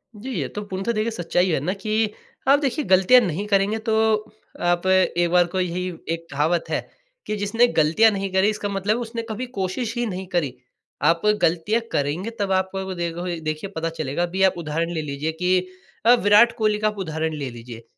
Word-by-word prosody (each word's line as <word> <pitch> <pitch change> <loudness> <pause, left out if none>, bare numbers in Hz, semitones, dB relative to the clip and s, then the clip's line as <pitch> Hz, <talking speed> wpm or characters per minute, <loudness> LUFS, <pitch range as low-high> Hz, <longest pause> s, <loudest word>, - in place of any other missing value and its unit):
जी, 220 +6 -8
ये - - -2
तो 210 - -6
पूर्णतः 195 +3 -2
देखिए 220 0 -1
सच्चाई 180 -2 0
है 160 - +1
ना 165 +7 -1
कि 215 +1 -1 0.4
आप 280 +1 +6
देखिए 290 +1 -1
गलतियाँ 190 +6 +6
नहीं 185 0 -2
करेंगे 200 +1 +2
तो 220 - +3 0.7
आप 175 +1 +1
एक 180 -2 +3
बार 180 0 +5
को 185 +2 -3
यही 180 0 -1 0.3
एक 165 0 -6
कहावत 155 +5 0
है - - 0 0.5
कि 215 - -1
जिसने 210 +4 +2
गलतियाँ 165 +4 +4
नहीं 195 -1 -3
करीं 190 +2 +4
इसका 210 -1 -3
मतलब 200 +2 0
है 240 - -3
उसने 230 0 -4
कभी 220 +4 -3
कोशिश 210 +5 -2
ही 240 - 0
नहीं 190 -3 -4
करी। 175 -8 -1 0.5
आप 165 0 +3 0.2
गलतियाँ 180 +8 +2
करेंगे 150 +9 -1
तब 200 -1 -1
आपको 190 0 -1
देखोगे 170 0 -3
देखिए 155 +4 -4
पता 165 +1 -1
चलेगा। 160 0 -3
अभी 180 +2 -2
आप 190 -1 +5
उदाहरण 165 +1 -2
ले 160 - -2
लीजिए 150 +1 -3
कि 180 +3 +1 0.5
अ, 240 - +8
विराट 220 0 +5
कोहली 215 -1 +2
का 215 - +1
आप 210 -1 -3
उदाहरण 160 -3 -2
ले 140 -3 -4
लीजिए। 115 -1 -10
185 Hz, 200 wpm, -23 LUFS, 165-210 Hz, 0.7 s, अ